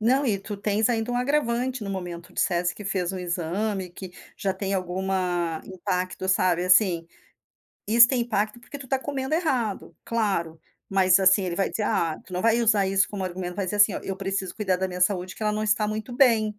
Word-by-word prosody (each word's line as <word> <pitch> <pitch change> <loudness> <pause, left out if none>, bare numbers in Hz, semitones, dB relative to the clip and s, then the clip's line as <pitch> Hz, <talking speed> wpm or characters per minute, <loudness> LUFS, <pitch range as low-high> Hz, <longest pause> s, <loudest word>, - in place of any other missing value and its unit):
Não, 260 +6 +3
e 210 -6 +1
tu 205 +1 -7
tens 210 +2 +1
ainda 235 0 -1
um - - 0
agravante 250 -2 0
no 200 - -4
momento, 175 -2 -6
tu - - -21
disseste 175 0 0
que 210 - -10
fez 185 -2 -1
um 190 - -4
exame, 180 +2 -2
que 185 +1 -9 0.3
já 195 - -1
tem 195 +1 -4
alguma 180 -3 -1
impacto, 185 0 -3
sabe. 180 -2 +2
Assim, 180 -3 +4 0.8
isso 235 +3 +7
tem 255 -3 +1
impacto 215 0 -1
porque 250 +4 -10
tu 260 - -11
tá 270 - +1
comendo 270 +1 -3
errado. 255 - -1
Claro, 195 -8 -1 0.3
mas 190 -1 +4
assim 190 +1 +5
ele 175 -2 -2
vai 195 - 0
dizer 215 - -2
ah, 165 -5 0
tu - - -14
não 180 - -2
vai 230 +1 +3
usar 215 -4 +3
isso 195 +1 +2
como 200 -2 -5
argumento, 180 -1 -5
vai 200 -2 -2
dizer 205 +3 -2
assim, 205 0 +5
olha, - - -6
eu 195 - -4
preciso 195 -1 -3
cuidar 190 -4 0
da 190 +1 -2
minha 180 0 -6
saúde, 185 -1 0
que - - -8
ela 210 0 +1
não 215 0 -2
está 210 0 +1
muito 215 +3 -4
bem. 225 -5 +3
195 Hz, 215 wpm, -25 LUFS, 185-225 Hz, 0.8 s, isso